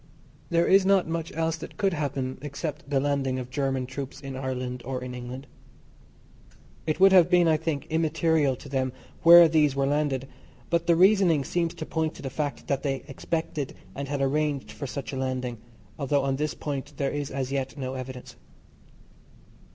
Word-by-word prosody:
There 170 0 +3
is 195 0 +5
not 195 -2 +3
much 165 0 -3
else 165 0 0
that 160 - -10
could 195 -2 +1
happen 135 -4 -3
except 145 +1 -5
the 140 -2 +2
landing 135 -2 0
of 125 -1 -6
German 135 -1 -1
troops 135 +1 -6
in 135 -2 -7
Ireland 130 -1 -4
or 130 0 -4
in 125 0 -6
England. 125 +2 -7 1.4
It 155 - 0
would 195 0 +7
have 180 -3 +6
been, 175 -2 +5
I 160 - +4
think, 155 -3 -3
immaterial 160 -3 +1
to 135 - -12
them 130 -2 -1 0.3
where 170 0 +10
these 150 -3 +3
were 135 0 +1
landed, 140 -2 0 0.4
but 170 -1 +1
the 170 - +5
reasoning 185 -5 +5
seems 170 +4 -1
to 155 - -5
point 160 -1 -2
to - - -11
the 135 - -4
fact 145 0 -3
that 140 -2 0
they 135 -3 -2
expected 150 0 -3 0.2
and 140 0 -5
had 140 0 -2
arranged 145 0 0
for 140 - -6
such 135 -3 -5
a - - -3
landing, 130 -3 -3 0.4
although 140 0 +1
on 135 -1 0
this 150 +1 -2
point 145 0 -5
there 140 -1 0
is 145 -1 -3
as 135 -1 -3
yet 135 +1 -2
no 130 -1 -4
evidence. 130 -1 -7
140 Hz, 185 wpm, -27 LUFS, 130-160 Hz, 1.4 s, where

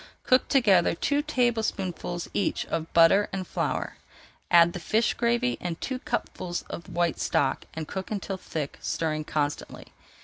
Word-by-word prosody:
Cook 255 -1 +3
together 200 -11 +4
two 285 +10 +1
tablespoonfuls 220 - -1
each 200 - 0
of 165 0 -3
butter 170 +5 +5
and 190 -1 -3
flour, - - -2 0.5
add 170 0 +6
the - - -5
fish 220 +7 +1
gravy 240 +1 0
and 170 -2 -4
two 260 -1 -3
cupfuls 185 -8 -3
of 170 - -7
white 175 -1 0
stock, 135 -1 0
and 160 -1 -4
cook 190 -1 -5
until 200 -2 -3
thick, 155 -5 -5
stirring 155 -2 -2
constantly. 145 -1 -3
180 Hz, 145 wpm, -27 LUFS, 165-235 Hz, 0.5 s, add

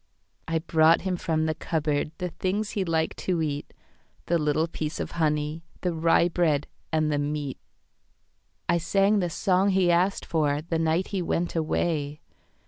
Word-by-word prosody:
I 165 0 0
brought 160 0 +4
him 190 -1 -1
from 160 -2 0
the 155 - +1
cupboardThe 155 +2 -2
things 200 +3 -1
he 200 - -1
liked 160 -2 0
to 180 -3 -1
eat,—The 155 +2 -4
little 150 +1 +1
piece 155 -2 -4
of - - -4
honey, 150 -1 0 0.2
The 180 -2 0
rye 165 +1 +3
bread 165 -5 +1 0.3
and 155 -1 +1
the 145 - +1
meat.I 145 +3 -6
sang 195 +5 +2
the 175 -2 0
song 185 +3 +2
he 185 -2 +3
asked 180 +3 +1
forThe 155 +1 0
night 165 +3 +1
he 195 -2 -1
went 175 0 -1
away. 155 -2 -1
165 Hz, 145 wpm, -26 LUFS, 155-175 Hz, 0.3 s, brought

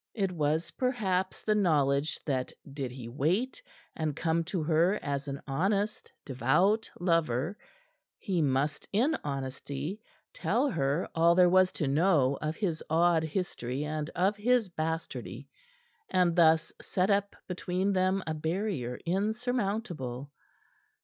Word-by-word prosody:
It 195 -4 0
was, 155 0 0
perhaps, 195 -8 -1
the 215 - +2
knowledge 150 -7 +2
that 130 -4 -1 0.2
did 135 -3 -3
he 125 -2 -8
wait, 175 - 0 0.3
and 155 -3 -2
come 165 0 +1
to 170 -1 -2
her 165 +5 +3
as 140 0 -2
an 140 0 -5
honest, 195 +9 -1
devout 155 - +2
lover, 165 - +1 0.6
he 185 -6 -1
must 145 +1 0
in 255 +10 +2
honesty 140 +6 -4 0.3
tell 290 - +1
her 145 0 0
all 170 +1 +4
there 180 -1 +6
was 185 0 +5
to 150 - -2
know 145 -2 +3
of 155 +1 -2
his 175 -7 -2
odd 165 +1 +4
history 150 -6 -3
and 155 0 -3
of 190 +4 +2
his 235 -1 +2
bastardy, 160 -1 -4 0.6
and 180 -2 +2
thus 160 -1 +4
set 185 +2 0
up 200 0 +1
between 185 +2 -1
them 185 +1 +1
a 160 - -2
barrier 160 - -2
insurmountable. 195 - -2
165 Hz, 130 wpm, -30 LUFS, 145-195 Hz, 0.6 s, there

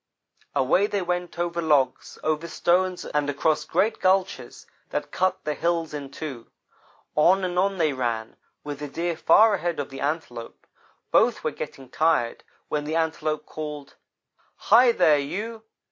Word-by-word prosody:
"Away 185 +10 +3
they 200 -2 -1
went 180 0 -3
over 170 0 -1
logs, 150 -5 +1
over 155 +1 -1
stones 180 +2 +1
and 145 -1 -1
across 150 +2 +1
great 220 +3 +1
gulches 190 +1 0 0.2
that - - -3
cut 185 0 0
the 150 - -1
hills 165 -1 -1
in 145 -2 -5
two. 135 -4 -7 0.7
On 180 +5 +4
and 180 -1 0
on 195 +1 +1
they 155 -4 +2
ran, 115 -3 -3 0.3
with 145 -1 -6
the 145 - -5
Deer 170 +4 -2
far 215 +6 +5
ahead 175 -4 -1
of 140 -1 -4
the 135 - -8
Antelope. 140 -6 -4 0.5
Both - - +3
were - - 0
getting 135 -1 -8
tired, 155 -5 +1 0.2
when 150 -1 -2
the 155 +2 -2
Antelope 155 -2 -1
called: 150 -2 -7 0.6
"'Hi, 240 +3 +5
there 160 -9 +4
you! 215 +10 -5
160 Hz, 155 wpm, -25 LUFS, 145-180 Hz, 0.7 s, far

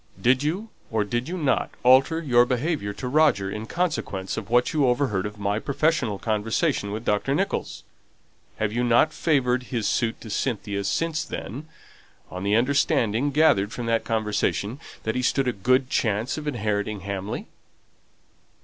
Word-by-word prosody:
Did 125 +6 +3
you 180 +10 -2 0.2
or 110 -2 +1
did 120 +7 -2
you 185 - -3
not 145 -6 +1
alter 130 +6 +5
your 120 -5 +5
behaviour 125 -2 -1
to 125 - -6
Roger 125 -9 +3
in 105 +2 -5
consequence 110 - -2
of 110 -2 -6
what 120 +1 +2
you 145 -4 +3
overheard 120 -6 +1
of 105 0 -10
my 100 +1 -1
professional 140 -5 0
conversation 110 - 0
with 110 +3 -5
Dr. 105 +7 +1
Nicholls? 195 +5 -2 0.7
Have 110 -1 -1
you 120 +1 0
not 120 +6 +4
favoured 130 -6 +1
his 115 -4 -1
suit 115 -2 0
to 110 - -8
Cynthia 100 -4 -2
since 160 +6 0
then, 140 +5 -7 0.6
on 90 - -6
the 100 +2 +1
understanding 125 -1 +2
gathered 140 -9 +3
from 120 - -5
that 115 -1 +1
conversation 110 +1 -1 0.2
that 110 - -1
he 125 - -1
stood 135 +1 +1
a 125 - +1
good 130 +6 +2
chance 110 +2 0
of 150 -1 -6
inheriting 105 -5 -2
Hamley?" 100 +1 -4
120 Hz, 160 wpm, -25 LUFS, 105-140 Hz, 0.7 s, alter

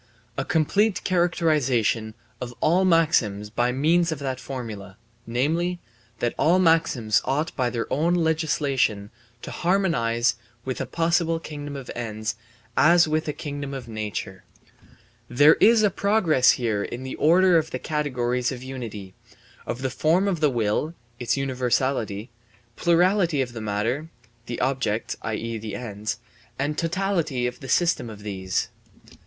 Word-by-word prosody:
A 135 - -1
complete 190 +8 +1
characterization 145 - +1 0.3
of 120 -1 -6
all 175 +5 +3
maxims 120 - +2
by 120 +2 +1
means 165 +6 +2
of 160 - -2
that 130 -2 -4
formula, 110 -7 -7 0.3
namely, 165 +9 0 0.4
that 120 - -1
all 165 +6 +4
maxims 160 - +3
ought 150 +4 -1
by 125 -2 +1
their 120 -2 -2
own 165 +5 +2
legislation 145 -10 0 0.3
to - - -6
harmonize 120 - +1 0.3
with 130 -1 -3
a - - -3
possible 165 0 +1
kingdom 145 -2 -7
of 135 -3 -7
ends 110 -2 -3 0.4
as 170 +1 +5
with 155 +1 -1
a - - 0
kingdom 145 -2 -6
of 130 -3 -7
nature. 105 -4 -5 0.5
* 115 +1 -31
There 150 +2 +9
is 225 0 +6
a 205 - +4
progress 175 - +3
here 110 -4 -1
in 120 +5 -5
the 130 - -5
order 180 +3 +5
of 160 0 -4
the - - -3
categories 125 -5 -1
of 125 -1 -7
unity 115 -8 -7 0.5
of 120 +2 -4
the 130 - -1
form 165 +9 +2
of 185 -5 0
the 150 -1 +3
will 120 +7 -1 0.2
(its 120 +2 0
universality), 125 -4 -1 0.4
plurality 175 -2 +3
of 125 -3 -1
the 115 - -6
matter 110 +9 -2 0.4
(the 120 - -4
objects, 130 -5 -1
i.e., 115 +1 -3
the 110 0 -6
ends), 110 -1 -4 0.4
and 145 +3 -1
totality 165 -7 -1
of 125 0 -3
the 135 - -9
system 170 -6 +2
of 105 -2 -10
these. 95 -3 -2
135 Hz, 150 wpm, -24 LUFS, 115-165 Hz, 0.5 s, There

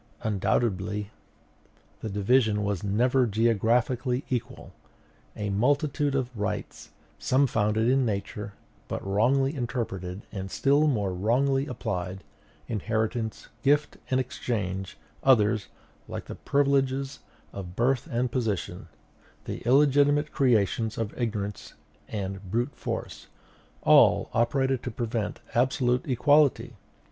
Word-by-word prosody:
Undoubtedly 100 0 0 0.9
the 110 - -5
division 105 +1 +2
was 100 -2 -2
never 125 +5 +2
geographically 120 +4 +1
equal; 125 -3 -4 0.6
a 105 -1 -3
multitude 140 +6 +1
of 125 -2 -2
rights, 105 -1 -4 0.3
some 135 +2 +3
founded 110 -2 +1
in 135 +1 +3
Nature, 105 -2 -3 0.3
but - - -5
wrongly 130 +8 +2
interpreted 105 -7 -4
and 95 -2 -5
still 140 +8 +3
more 105 -9 0
wrongly 135 +8 +1
applied, 95 -7 -4 0.4
inheritance, 110 +1 -2
gift, 145 +3 +2
and 130 - +2
exchange; 100 -7 -3 0.2
others, 110 -5 +3 0.4
like - - -6
the - - -7
privileges 140 -1 0 0.3
of 90 -2 -7
birth 125 +5 +1
and 120 -1 -1
position, 115 -7 -2 0.6
the - - -4
illegitimate 145 +2 +4
creations 115 -3 +1
of 110 -2 -3
ignorance 105 -4 -4 0.3
and 95 -2 -5
brute 120 +7 -1
force, - - -5 0.6
all - - +5
operated 130 +2 +1
to - - -4
prevent 115 -2 -3
absolute 125 0 +1
equality. 145 +2 +3
115 Hz, 110 wpm, -27 LUFS, 105-135 Hz, 0.9 s, all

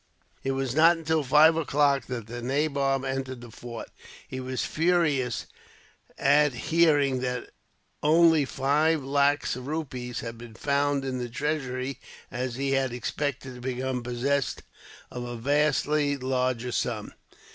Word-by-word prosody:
It 135 - 0
was 135 -2 -2
not 165 +3 +6
until 160 -1 0
five 150 +4 +6
o'clock 145 -3 +2
that 125 -4 -4
the 120 +2 -7
nabob 135 0 0
entered 130 -1 -3
the 120 -1 -11
fort. 120 0 -8 0.4
He 130 - -6
was 130 0 -3
furious 155 -7 +1 0.7
at 145 0 +4 0.2
hearing 145 -5 +4
that 125 -1 -3 0.5
only 160 0 +5
five 145 +4 +1
lacs 140 0 +2
of 125 +1 -8
rupees 130 -6 -4
had 115 -1 -7
been 115 -2 -11
found 140 +1 0
in 130 -1 -2
the 120 -1 -4
treasury, 130 -1 -3 0.3
as 125 0 -3
he 135 +1 -1
had 135 -2 +1
expected 130 +2 -3
to 125 - -11
become 130 0 -2
possessed 125 +3 -1 0.5
of 125 - -5
a 120 0 -5
vastly 145 +2 +1
larger 130 -2 -1
sum. - - -2
135 Hz, 140 wpm, -27 LUFS, 125-150 Hz, 0.7 s, not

